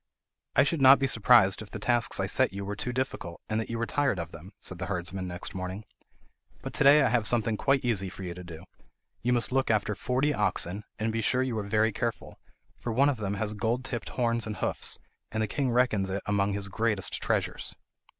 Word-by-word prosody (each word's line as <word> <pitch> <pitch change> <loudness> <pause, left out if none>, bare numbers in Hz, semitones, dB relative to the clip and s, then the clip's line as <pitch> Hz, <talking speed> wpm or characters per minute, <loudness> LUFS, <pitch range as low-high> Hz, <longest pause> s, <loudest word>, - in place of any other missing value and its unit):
"I - - +6
should 145 +1 0
not 135 +1 +9
be 135 - 0
surprised 115 -5 +5
if 105 - -9
the - - -6
tasks 120 +2 +1
I - - +1
set - - +1
you 100 0 -5
were 100 +1 -4
too 125 +4 -3
difficult, 125 -9 -4
and 110 0 -1
that 110 - -4
you 115 - -3
were 115 - -1
tired 145 -5 0
of 85 -1 -5
them," 85 +4 -11
said 95 - -6
the 95 - -3
herdsman 95 0 -3
next 90 0 -7
morning; 95 +3 -5 0.8
"but - - -6
to - - +2
day 140 +1 +7
I 125 - +3
have 115 -2 +1
something 115 -1 +2
quite 135 +4 +1
easy 100 -6 0
for 95 - -9
you 90 -1 -4
to 90 +1 -9
do. 85 -2 -10 0.6
You 125 - 0
must 120 0 +3
look 135 +1 +1
after 105 -1 +1
forty 130 +8 0
oxen, 105 -3 0
and 110 0 -1
be 115 - 0
sure 125 +4 +2
you 130 -3 -2
are 100 - -5
very 110 +2 +2
careful, 115 +1 -4 0.4
for 120 - -3
one 135 +5 +4
of 140 - -1
them 100 -2 -2
has 105 +1 -1
gold 115 +4 -1
tipped 120 -3 -4
horns 115 -2 0
and 105 - -4
hoofs, - - -2 0.3
and 110 0 -1
the - - -1
king 135 +4 -1
reckons 120 -5 +2
it 100 +1 -3
among 100 -1 +1
his 100 0 -3
greatest 105 0 -1
treasures." - - -2
110 Hz, 230 wpm, -28 LUFS, 100-125 Hz, 0.8 s, not